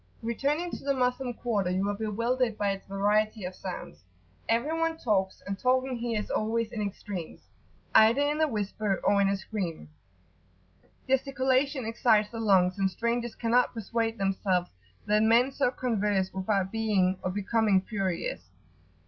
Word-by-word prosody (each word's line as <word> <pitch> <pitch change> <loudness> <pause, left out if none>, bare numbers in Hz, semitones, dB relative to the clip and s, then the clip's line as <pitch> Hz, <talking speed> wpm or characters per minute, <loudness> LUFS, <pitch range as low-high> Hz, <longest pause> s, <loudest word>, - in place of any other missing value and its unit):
[FN#16] - - -5
Returning 295 +8 -1
to - - -7
the 280 0 +1
Moslem 250 0 0
quarter, 210 -7 -1
you 190 +2 0
are 205 - 0
bewildered 230 +3 -1
[p.82]by 200 -1 +1
its 195 - -10
variety 210 +2 +1
of 180 - -5
sounds. 180 - -8 0.5
Everyone 320 +8 +1
talks, 195 -9 0
and 200 0 -4
talking 255 +1 +1
here 230 -2 -1
is 210 - -5
always 225 +1 0
in 225 -3 -4
extremes, 200 -4 -5 0.5
either 225 +5 +6
in 295 +2 +1
a 315 - +4
whisper, 210 -4 -2
or 200 0 +3
in 195 - +3
a 200 - 0
scream; 185 - -5 1.2
gesticulation 265 0 +1
excites 220 -2 +2
the 230 - -6
lungs, 190 -3 +3
and 195 -1 +2
strangers 235 +4 -2
cannot 240 +2 +2
persuade 225 +1 -2
themselves 190 -2 0 0.3
that 210 +1 +3
men 230 +4 +4
so 255 - +1
converse 210 -6 -1
without 190 0 0
being 200 -5 +1
or 185 - -2
becoming 205 +1 +2
furious. 185 - -3
215 Hz, 155 wpm, -28 LUFS, 195-245 Hz, 1.2 s, either